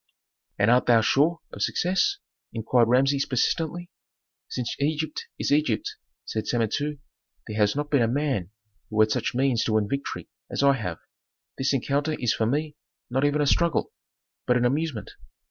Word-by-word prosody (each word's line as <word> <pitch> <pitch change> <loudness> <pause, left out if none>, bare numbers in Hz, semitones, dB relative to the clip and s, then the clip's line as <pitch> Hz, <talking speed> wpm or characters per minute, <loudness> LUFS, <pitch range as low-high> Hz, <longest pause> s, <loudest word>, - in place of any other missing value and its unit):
"And 105 +3 +3
art 125 +1 +3
thou 115 -2 +6
sure 150 +9 +2
of - - -7
success?" 190 - +1 0.4
inquired 115 +1 +2
Rameses 135 +3 +3
persistently. 165 +6 -1 0.6
"Since 125 -2 -3
Egypt 155 +1 -2
is - - -2
Egypt," 145 -7 +1 0.3
said 110 - -3
Samentu, 135 +6 -1 0.5
"there 105 - -6
has 105 -1 +2
not 145 +1 -3
been 140 -4 +4
a 115 - +3
man 130 - -1 0.4
who 110 - -2
had 110 0 +4
such - - -1
means 130 -2 +2
to 110 - 0
win 110 -1 +2
victory 140 +5 -4 0.2
as - - -1
I 140 0 +6
have. 90 -10 -4 0.6
This 135 +1 +1
encounter 140 +3 0
is 120 -6 0
for 110 - 0
me 150 +4 -1 0.4
not 135 +3 +1
even 145 +1 +2
a - - +2
struggle, 170 +3 +1 0.5
but 125 - +4
an 125 - +1
amusement. 140 -2 -1
135 Hz, 165 wpm, -25 LUFS, 115-150 Hz, 0.6 s, thou